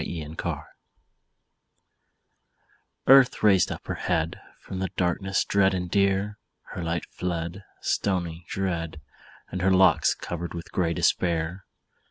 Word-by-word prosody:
EARTH'S 85 - -4
ANSWER 80 - -4 2.4
Earth 135 -3 +6
raised 95 -4 +5
up - - -6
her - - -3
head 80 0 -1 0.2
From 95 - -7
the 95 -1 -1
darkness 95 +2 0
dread 95 -1 +3
and 90 -1 -3
drear, 100 +1 +1 0.3
Her 90 - -5
light 85 0 -2
fled, 85 +1 -4 0.2
Stony, 85 -4 -1
dread, 85 -5 -2 0.5
And 90 - -3
her 95 - +3
locks 95 -3 +5
covered 85 0 -5
with 85 0 -7
grey 85 -2 0
despair. 85 +3 0
90 Hz, 125 wpm, -26 LUFS, 85-95 Hz, 2.4 s, Earth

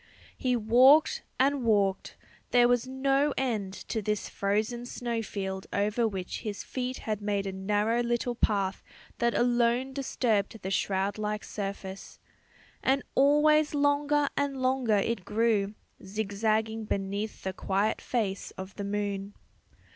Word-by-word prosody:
He 250 -1 0
walked 250 +7 +5 0.2
and 275 +1 +3
walked; 200 -4 +1 0.3
there 245 -1 +5
was 245 0 +2
no 270 +2 +1
end 220 -7 -1 0.2
to 220 - -1
this 210 0 -2
frozen 215 +5 -1
snow 235 -2 -3
field 190 -3 -5
over 210 +3 +1
which 190 -4 -4
his 210 -3 -5
feet 255 0 -4
had 215 -2 -2
made 205 -1 -1
a 195 - -2
narrow 210 +4 0
little 240 +1 0
path 200 -5 0 0.4
that 235 0 +1
alone 240 +2 +2
disturbed 225 -6 0
the 190 - -3
shroud 195 +1 0
like 210 0 -2
surface. 195 -1 -6 0.6
And 270 +1 +2
always 300 +2 +4
longer 290 0 +2
and 280 -1 -1
longer 255 -4 +2
it 200 0 -1
grew, 215 -1 +1 0.3
zigzagging 220 +2 -1
beneath 200 +1 -3
the 190 - -2
quiet 200 +3 0
face 205 -6 -2
of 190 +1 -8
the 200 - -3
moon. 200 0 -3
220 Hz, 135 wpm, -29 LUFS, 200-250 Hz, 0.6 s, walked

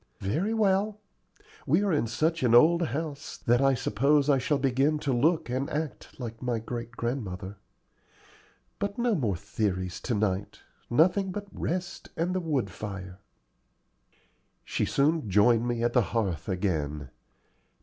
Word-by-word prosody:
"Very 155 - -1
well. 210 -1 +2 0.7
We 165 +9 +3
are 200 -4 +1
in 145 -6 +1
such 160 +8 0
an 120 -2 +4
old 170 +7 +6
house 150 0 -5
that 120 0 +2
I 135 -1 +4
suppose 140 +5 +2
I 135 - +3
shall 145 +3 +1
begin 135 +3 +2
to 145 -3 -1
look 160 +6 +2
and 130 +3 -2
act 150 -2 -5
like 115 -2 -6
my 125 -2 -1
great 115 +1 -6
grandmother. 105 -6 -4 1.2
But 200 0 -2
no 240 -1 +2
more 120 - 0
theories 95 -1 -2
to 120 - -2
night 100 -1 -1 0.3
nothing 180 +9 +3
but 205 +2 -5
rest 180 +2 -4
and 175 +3 0
the 185 - 0
wood 145 - -1
fire." 95 -1 -7 1.5
She - - -1
soon 145 -4 +1
joined 115 +4 +4
me 120 -1 -1
at 120 0 +1
the 125 - +5
hearth 100 -6 -2
again. 75 -8 -2
125 Hz, 150 wpm, -28 LUFS, 105-160 Hz, 1.5 s, old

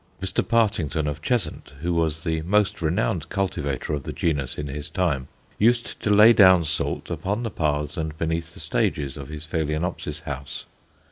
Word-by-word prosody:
Mr. 95 0 0
Partington, 95 - +1
of 75 0 -3
Cheshunt, 115 -5 -2
who 85 +1 0
was 80 -1 0
the 80 -2 -1
most 100 +4 +1
renowned 85 0 0
cultivator 75 -8 -2
of 75 - -1
the - - -6
genus 75 -6 -1
in 75 - -3
his 70 +1 -5
time, 75 -9 0 0.3
used 120 +2 +2
to - - -2
lay 105 +3 +8
down 95 -5 +7
salt 80 +2 -2
upon 105 +5 -2
the 115 - -3
paths 75 -1 -1
and 80 -1 -3
beneath 80 +1 -2
the - - -10
stages 70 -3 -1
of 70 -3 -7
his 75 +1 -7
Phaloenopsis 80 -1 -2
house. 70 -3 -6
80 Hz, 175 wpm, -24 LUFS, 75-95 Hz, 0.3 s, lay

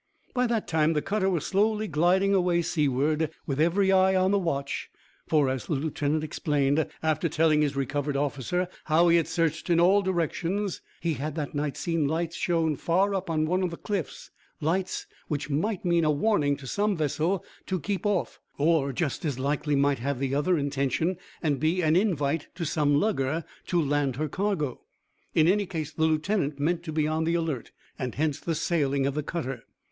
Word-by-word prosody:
By 250 -1 +2
that 230 -2 -1
time 160 0 +2
the 150 - +1
cutter 195 -1 0
was 175 -5 -1
slowly 215 +2 +1
gliding 180 +5 +3
away 175 -2 +2
seaward, 150 +1 +1 0.2
with 140 0 -1
every 190 +4 +3
eye 190 0 +4
on 185 +1 +3
the 200 - +3
watch, 140 -6 -2 0.4
for, 150 -3 +3
as 130 -1 -2
the - - -1
lieutenant 150 +1 -1
explained, 150 -1 +1 0.2
after 160 +1 +1
telling 155 0 +3
his 145 -2 0
recovered 140 +1 -1
officer 145 +6 -1 0.2
how 165 +2 +4
he 170 - +6
had 165 - +1
searched 165 0 -1
in 170 -1 +4
all 190 +4 +5
directions, 185 +1 -1 0.2
he 165 -1 0
had 150 +1 -4
that 150 -3 -4
night 145 -1 -2
seen 165 -4 0
lights 165 +2 -2
shown 165 -3 +1
far 190 +4 +1
up 190 -2 -2
on 155 -1 +1
one 180 +4 +1
of 185 - 0
the 170 - -7
cliffs 200 -7 -4 0.3
lights 180 +5 -1 0.2
which 150 0 -3
might 190 +8 -1
mean 170 -1 +3
a 155 - +3
warning 150 -3 +2
to 135 - -11
some 205 +7 0
vessel 160 +4 0 0.2
to 185 -1 -1
keep 200 +3 -3
off, 205 -4 -1 0.2
or 150 -2 +2
just 140 +2 -2
as 145 -6 -1
likely 145 +2 0
might 140 -1 +2
have 140 +3 -2
the 135 +1 -2
other 155 +5 +2
intention, 145 +4 0 0.3
and 145 -4 +1
be 165 +5 +1
an 155 0 +3
invite 165 -6 +1
to 170 - -3
some 145 -2 +2
lugger 160 -6 0 0.2
to 175 - +1
land 145 -4 +1
her 155 +3 -1
cargo. 175 -5 -2 0.5
In 160 0 +5
any 200 +2 +2
case 155 -4 -4
the 160 - +1
lieutenant 155 -2 0
meant 165 +4 +1
to 160 - -4
be 155 -1 +1
on 155 +1 0
the 165 +1 +1
alert, 160 -8 -2 0.3
and 125 -2 -3
hence 150 -1 0
the 165 - -2
sailing 140 -4 +1
of 140 - 0
the 150 - -1
cutter. 135 -6 -4
160 Hz, 195 wpm, -27 LUFS, 145-180 Hz, 0.5 s, he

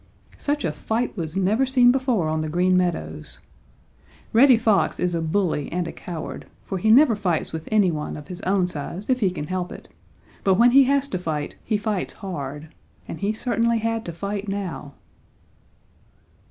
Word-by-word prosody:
Such 290 0 -1
a 160 - 0
fight 220 +12 -2
was 165 -2 -4
never 205 +7 +2
seen 255 -2 +5
before 250 - +1
on 155 0 -1
the 155 - -3
Green 180 +3 +2
Meadows! 180 -2 -2 1.0
Reddy 250 +2 +7
Fox 220 -4 +2
is 180 -1 0
a 165 - -1
bully 160 -3 -1
and 175 0 -2
a - - -5
coward, 170 -3 -7 0.2
for 190 - -4
he 220 - +1
never 245 +1 +6
fights 180 -7 -1
with 160 0 -6
any 205 -4 +4
one 150 -1 -4
of 150 - -10
his 180 0 -8
own 190 -1 +1
size 175 - -5
if 255 - +2
he 200 -5 +2
can 175 -5 -5
help 185 +2 -3
it, - - -11 0.5
but 190 -1 +4
when 235 +4 +5
he 270 +1 +7
has 280 +1 +2
to 185 - -2
fight, 155 -4 -3
he 215 - 0
fights 205 -2 -2
hard. 150 -6 -6 0.4
And 165 - -7
he 200 +1 0
certainly 235 +1 +1
had 225 0 -1
to 170 - -4
fight 200 +4 -4
now. 185 -7 -5
195 Hz, 185 wpm, -23 LUFS, 170-225 Hz, 1.0 s, Reddy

